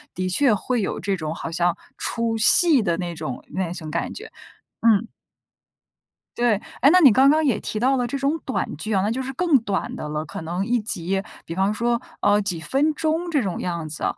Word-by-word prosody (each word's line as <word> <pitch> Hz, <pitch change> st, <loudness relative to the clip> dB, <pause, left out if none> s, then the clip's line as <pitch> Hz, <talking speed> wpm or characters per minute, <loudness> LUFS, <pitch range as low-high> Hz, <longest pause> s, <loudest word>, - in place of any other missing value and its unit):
的 185 Hz, 0 st, -2 dB
确 245 Hz, +4 st, +3 dB
会 240 Hz, +3 st, -1 dB
有 -, -, -3 dB
这 195 Hz, +1 st, -1 dB
种 155 Hz, 0 st, -4 dB
好 165 Hz, -, -6 dB
像 175 Hz, 0 st, +1 dB, 0.2 s
出 230 Hz, -1 st, -2 dB
戏 290 Hz, +4 st, +6 dB
的 170 Hz, -5 st, 0 dB
那 175 Hz, -1 st, -4 dB
种 155 Hz, -6 st, -6 dB
那 185 Hz, -2 st, -3 dB
种 160 Hz, -4 st, -7 dB
感 170 Hz, -, -2 dB
觉， 445 Hz, +2 st, -10 dB, 0.5 s
嗯。 225 Hz, -1 st, +3 dB, 1.3 s
对。 240 Hz, -2 st, +3 dB, 0.3 s
哎， 275 Hz, -, +7 dB
那 365 Hz, -, +6 dB
你 285 Hz, -8 st, +8 dB
刚 265 Hz, +6 st, +5 dB
刚 310 Hz, +1 st, +3 dB
也 235 Hz, -7 st, +1 dB
提 215 Hz, -, -4 dB
到 265 Hz, +3 st, +3 dB
了 245 Hz, -1 st, 0 dB
这 275 Hz, -, -3 dB
种 280 Hz, +4 st, 0 dB
短 260 Hz, -, -2 dB
剧 215 Hz, +8 st, -4 dB
啊， 190 Hz, -, +2 dB
那 210 Hz, -, 0 dB
就 255 Hz, +3 st, -2 dB
是 265 Hz, +1 st, -4 dB
更 330 Hz, -1 st, +3 dB
短 205 Hz, -4 st, -3 dB
的 150 Hz, -, -6 dB
了， 150 Hz, +1 st, -3 dB
可 -, -, -7 dB
能 175 Hz, +4 st, -3 dB
一 240 Hz, +1 st, +1 dB
集 195 Hz, -2 st, -1 dB, 0.2 s
比 165 Hz, -, -6 dB
方 190 Hz, +2 st, +1 dB
说， 235 Hz, +2 st, 0 dB, 0.2 s
呃， 205 Hz, 0 st, +3 dB
几 185 Hz, -5 st, -2 dB
分 275 Hz, -, +1 dB
钟 325 Hz, +2 st, -1 dB
这 295 Hz, -5 st, +1 dB
种 190 Hz, -4 st, -3 dB
样 170 Hz, -3 st, -3 dB
子。 155 Hz, 0 st, -6 dB
215 Hz, 235 characters per minute, -23 LUFS, 175-265 Hz, 1.3 s, 你